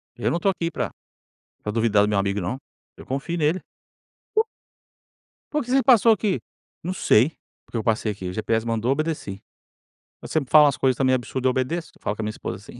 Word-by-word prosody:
Eu - - -1
não 170 - +1
estou 195 +2 +2
aqui 170 -2 -3
para - - -3 0.7
para 105 - -2
duvidar 110 -2 +3
do 105 - +1
meu 105 - +1
amigo 100 +1 0
não. 95 +9 -2 0.4
Eu - - -12
confio 140 +6 -3
nele. 160 +4 +2 1.9
"Por 300 -1 0
que 245 - -6
você 270 0 +5
passou 235 -3 +6
aqui?". 210 -3 +1 0.4
"Não 180 +2 -2
sei, 135 -3 +4 0.3
porque - - -5
eu 110 - -2
passei 110 -1 +1
aqui, 95 -3 -6
o - - -6
GPS 110 +2 0
mandou, 115 +2 0
obedeci. 150 -9 -2 0.8
Você - - -8
sempre 145 -5 0
fala 150 -1 +9
umas 140 - +2
coisas 130 -2 +2
também 130 -1 +3
absurda, 130 +1 -2
eu 130 - +4
obedeço.". 145 +7 -2
Eu - - -25
falo 105 - -2
com 110 - -4
minha 105 - -1
esposa 105 - -5
assim. 110 +4 -13
130 Hz, 205 wpm, -24 LUFS, 110-165 Hz, 1.9 s, fala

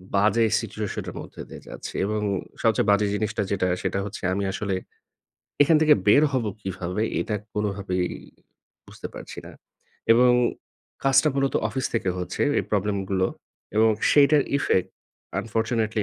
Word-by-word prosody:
বাজে 110 +3 +4 0.2
সিচুয়েশন - - -4
এর - - -9
মধ্যে - - -10
দিয়ে - - -10
যাচ্ছি। - - -8
এবং 105 0 -1 0.4
সবচেয়ে 110 -2 +2
বাজে 100 0 +3
জিনিসটা 110 +1 -1
যেটা 95 -2 +1 0.2
সেটা 100 - -1
হচ্ছে 105 - -7
আমি 100 - -1
আসলে 100 -1 -2 0.9
এখান 155 +2 +5
থেকে 155 -1 +7
বের 140 +8 +7
হব 130 -4 0 0.2
কীভাবে? 95 +1 -3 0.2
এটা 110 - -2 0.2
কোনভাবেই 100 -3 -1 0.8
বুঝতে - - -8
পারছি - - -9
না। - - -10 0.6
এবং 125 +2 +5 0.7
কাজটা 135 +3 +5
মূলত 135 0 +1
অফিস 130 -2 -2
থেকে 95 -5 +1
হচ্ছে 90 - -3 0.2
এই - - -1
প্রবলেম 105 0 +1
গুলো 95 -1 +2 0.5
এবং 110 +1 +5 0.2
সেইটার 145 0 +6 0.2
ইফেক্ট 95 -9 +1 0.5
আনফরচুনেটলি 110 -1 -1
105 Hz, 140 wpm, -25 LUFS, 100-120 Hz, 0.9 s, থেকে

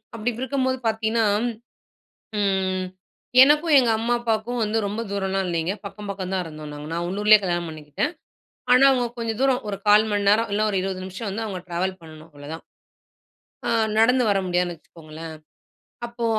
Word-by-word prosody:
அப்படி 230 +2 -1
இருக்கும்போது 260 -1 0
பார்த்தீங்கன்னா, 220 +1 +1 1.1
ம் 190 -2 0 0.6
எனக்கும், 300 +3 +4
எங்க 240 -3 +2
அம்மா 235 +2 0
அப்பாவுக்கும் 230 +1 -1
வந்து 215 +1 -1
ரொம்ப 210 +3 -3
தூரம்லாம் 195 -1 -1
இல்லைங்க. 170 +2 -1
பக்கம், 200 +1 -9
பக்கம் 190 -1 -5
தான் 185 -1 0
இருந்தோம் 155 -1 -9
நாங்க. 150 0 -8
நான் 170 +1 -2
உள்ளூரிலே 210 +3 +5
கல்யாணம் 175 -2 -1
பண்ணிக்கிட்டேன். 155 - -3 0.6
ஆனா 255 +2 +7
அவங்க 245 -2 +1
கொஞ்சம் 230 0 -3
தூரம். 265 -2 +2
ஒரு 195 -1 -3
0:15 210 +1 +6
மணி 205 -1 +1
நேரம், 225 +1 +2
இல்ல 210 - +1
ஒரு 195 - 0
20 185 -1 -4
நிமிஷம் 190 +3 -6
வந்து 220 +3 -3
அவங்க 190 -4 -5
ட்ராவல் 185 +2 -2
பண்ணணும் 155 0 -13
அவ்ளோதான். 145 +3 -9 1.0
ஆ - - 0 0.3
நடந்து 250 +3 +4
வர 195 - +2
முடியாதுன்னு 175 -1 0
வச்சுக்கோங்களேன். 160 0 -11 0.7
அப்போ 235 0 -4
200 Hz, 160 wpm, -23 LUFS, 175-230 Hz, 1.1 s, ஆனா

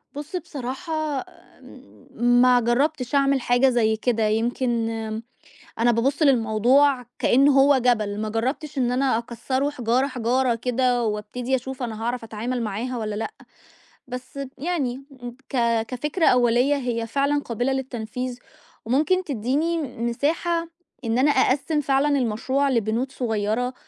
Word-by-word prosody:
بُصّ، 295 +4 -6
بصراحة 305 -2 -4 0.9
ما 245 +1 +4
جرّبتش 250 +3 0
أعمل 275 -1 +3
حاجة 245 +2 +3
زي 225 -3 +2
كده، 225 0 0
يمكن 235 +4 0 1.1
أنا 240 +1 +4
بابُصّ 270 +7 0
للموضوع 250 +1 +3
كإن 275 +3 +4
هو 275 0 +5
جبل، 215 -5 +1
ما 215 - -2
جرّبتش 265 +7 -3
إن 245 -2 +1
أنا 255 -2 +2
أكسّره 260 +4 -2
حجارة، 250 -1 0
حجارة 250 -1 0
كده، 250 +1 0
وأبتدي 220 +4 -2
أشوف 260 +1 -6
أنا 225 -2 -4
هاعرف 240 0 -2
أتعامل 230 +3 -3
معاها 230 +4 -3
والّا 215 -2 -3
لأ، 220 +1 -3 0.8
بس 255 +2 -8 0.2
يعني 275 -6 -2 0.4
ك 275 - -4 0.3
كفكرة 295 +9 -1
أولية 250 +3 +4
هي 240 -4 -2
فعلًا 280 +4 0
قابلة 245 +2 -1
للتنفيذ، 250 -1 -4 0.5
وممكن 305 +11 +1
تدّيني 290 - -1 0.2
مساحة 320 +8 -1 0.4
إن 230 +1 0
أنا 280 +3 +4
أقسّم 285 +3 +2
فعلًا 275 0 +2
المشروع 260 +4 0
لبنود 235 +2 0
صغيّرة، 230 +1 -1
250 Hz, 125 wpm, -23 LUFS, 230-275 Hz, 1.1 s, هو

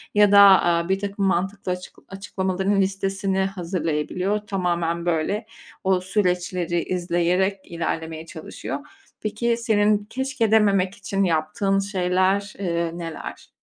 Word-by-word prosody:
ya 205 -1 +6
da, 200 - +8
aaa, 175 -3 +5
birtakım 200 +1 -1
mantıklı 195 +1 -1
açık 180 0 -9
açıklamaların 195 0 -1
listesini 195 0 -1
hazırlayabiliyor. 180 +1 -2
Tamamen 175 -3 -1
böyle 175 +6 0 0.4
o 190 -1 +2
süreçleri 180 -3 0
izleyerek 180 +2 0
ilerlemeye 160 -1 -4
çalışıyor. 160 - -6 0.4
Peki 230 +2 0
senin 210 -2 +2
keşke 260 -4 -1
dememek 200 -3 +3
için 195 0 -1
yaptığın 175 +4 +1
şeyler, 190 +1 0
eee, 170 -3 -1
neler? 165 -2 -7
190 Hz, 110 wpm, -23 LUFS, 175-200 Hz, 0.4 s, da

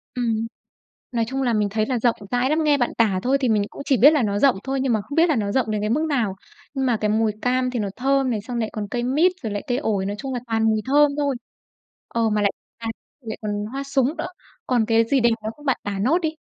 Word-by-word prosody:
Ừm. 230 -2 0 0.7
Nói 230 -1 +1
chung 265 +3 -2
là 245 -2 +1
mình 210 -2 +1
thấy 215 +1 0
là 250 -1 -1
rộng 235 0 +2 0.2
rãi 245 +1 +1
lắm, 310 +2 +2
nghe 295 -2 +4
bạn 245 -3 0
tả 210 -5 +3
thôi 265 +2 +3
thì 255 - +2
mình 210 -2 +3
cũng - - -9
chỉ 270 - +3
biết 290 +6 +7
là 300 - +3
nó 205 -1 0
rộng 270 -4 +4
thôi 270 0 -2
nhưng 260 -3 +1
mà 215 - +1
không 285 +8 -8
biết 335 +1 +4
là 310 - +3
nó 205 -4 -1
rộng 245 -5 +1
đến 210 -1 -1
cái 210 - -1
mức 305 +6 +1
nào. 230 -9 0 0.4
Nhưng 270 -2 -1
mà 240 -3 +2
cái 210 - +1
mùi 220 0 +2
cam 255 0 +1
thì 245 - -2
nó 205 -2 -1
thơm 270 0 +1
này, 215 -3 -1
xong 240 +3 -5
lại 220 -1 -1
còn 210 -2 -4
cây 240 -1 -1
mít 300 +9 +3
rồi 220 - -3
lại 205 - -3
cây 245 - 0
ổi, 210 -8 -1
nói 200 +1 -2
chung 270 -1 -4
là 245 - -2
toàn 225 -1 0
mùi 220 -1 +2
thơm 290 +2 +4
thôi. 285 -2 0 0.7
Ờ, 230 -1 0
mà 210 -1 +1 0.4
toàn 225 -1 -3 0.3
lại 225 -3 -6
còn 210 -1 -2 0.2
hoa 275 +1 -4
súng 275 +2 0
nữa. 320 +2 -3 0.4
Còn 240 -3 +2
cái 225 0 +4
gì 275 - +3
đẹp 235 -1 +4
nữa 215 - -2
không, 295 - -15
bạn 265 - +2
tả 200 -1 -3
nốt 270 - +3
đi? 315 -1 -2
245 Hz, 280 wpm, -23 LUFS, 220-270 Hz, 0.7 s, biết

